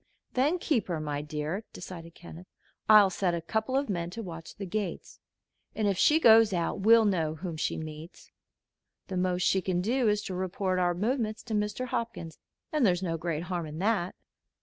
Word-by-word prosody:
"Then 285 +8 +2
keep 295 -9 0
her, 170 -4 -2
my 145 -1 -3
dear," 155 +6 -4
decided 170 -2 -9
Kenneth. 175 +1 -12 0.4
"I'll 210 -3 +8
set 180 -2 0
a - - -2
couple 220 +9 -1
of 280 - 0
men 170 -5 -2
to 225 +6 -6
watch 165 -3 -9
the 200 - -6
gates, 195 -1 -4 0.6
and 215 -2 0
if 200 - +2
she 300 - +4
goes 225 -6 +6
out 170 +1 -1
we'll 225 +3 +6
know 165 -6 0
whom 170 +1 -5
she 155 - -2
meets. 155 +2 -9 0.8
The 185 - -3
most 180 0 0
she 190 - +3
can 180 -1 -1
do 235 +5 +1
is 210 0 0
to 190 - -5
report 185 0 -1
our 175 -1 +1
movements 220 +2 -1
to 230 - -6
Mr. 210 +4 -1
Hopkins, 230 - -4 0.3
and 305 -3 +1
there's 180 -4 +3
no 165 -3 -1
great 165 -1 -3
harm 175 -2 -3
in 150 +1 -8
that." 190 -1 0
185 Hz, 195 wpm, -29 LUFS, 170-220 Hz, 0.8 s, I'll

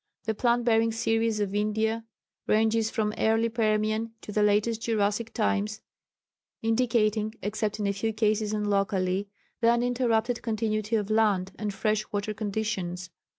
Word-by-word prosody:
The 220 +1 -1
plant 240 +2 +1
bearing 225 -1 +3
series 225 -1 0
of 200 -1 -1
India 220 +2 0 0.4
ranges 220 +1 +2
from 210 -1 -1
early 225 +1 +2
Permian 215 0 0
to - - -8
the 210 - +1
latest 210 +2 +2
Jurassic 220 0 0
times, 215 -1 0 0.8
indicating 225 -2 +1
(except 210 +1 -2
in 210 - -1
a 200 - +1
few 220 +3 -1
cases 215 -1 +1
and 210 -1 -1
locally) 195 -1 0 0.3
the 230 - +4
uninterrupted 240 -1 +1
continuity 215 -1 -1
of 210 -1 -1
land 205 -4 +2
and 210 -1 -2
fresh 215 +2 -1
water 205 0 -2
conditions. 200 -4 -3
215 Hz, 145 wpm, -27 LUFS, 210-225 Hz, 0.8 s, the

